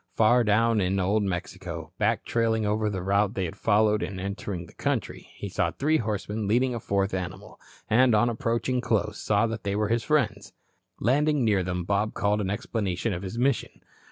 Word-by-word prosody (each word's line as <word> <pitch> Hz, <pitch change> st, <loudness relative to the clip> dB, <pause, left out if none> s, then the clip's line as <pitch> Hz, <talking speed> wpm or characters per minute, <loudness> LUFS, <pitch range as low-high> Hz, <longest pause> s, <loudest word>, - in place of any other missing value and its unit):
Far 120 Hz, +2 st, +4 dB
down 115 Hz, +1 st, +3 dB
in 95 Hz, +1 st, +1 dB
Old 100 Hz, +4 st, +2 dB
Mexico, 90 Hz, -4 st, -4 dB
back -, -, +1 dB
trailing 115 Hz, -2 st, +1 dB
over 105 Hz, +1 st, +1 dB
the 95 Hz, -3 st, -4 dB
route 100 Hz, +1 st, +1 dB
they 95 Hz, -, -1 dB
had 80 Hz, -, -6 dB
followed 105 Hz, 0 st, +2 dB
in 95 Hz, 0 st, -4 dB
entering 95 Hz, -2 st, -4 dB
the -, -, -17 dB
country, -, -, -3 dB
he -, -, -6 dB
saw -, -, 0 dB
three 155 Hz, +3 st, +1 dB
horsemen 105 Hz, -2 st, -3 dB
leading 125 Hz, +4 st, +2 dB
a 120 Hz, -, -3 dB
fourth 100 Hz, -2 st, -1 dB
animal, 95 Hz, +2 st, -6 dB, 0.3 s
and 120 Hz, +1 st, +4 dB
on 105 Hz, +3 st, +4 dB
approaching 120 Hz, +2 st, -1 dB
close, 105 Hz, -3 st, -1 dB
saw 105 Hz, +1 st, +2 dB
they 110 Hz, -3 st, -3 dB
were 105 Hz, 0 st, 0 dB
his 115 Hz, 0 st, +1 dB
friends. 140 Hz, -8 st, 0 dB, 0.5 s
Landing 145 Hz, +3 st, +2 dB
near 105 Hz, -3 st, +3 dB
them, 90 Hz, 0 st, -2 dB
Bob 100 Hz, +4 st, 0 dB
called 105 Hz, +1 st, +1 dB
an 95 Hz, -, -2 dB
explanation 105 Hz, 0 st, -2 dB
of 90 Hz, -, -4 dB
his 100 Hz, +4 st, -6 dB
mission. 130 Hz, +1 st, 0 dB
105 Hz, 185 wpm, -26 LUFS, 100-115 Hz, 0.5 s, Far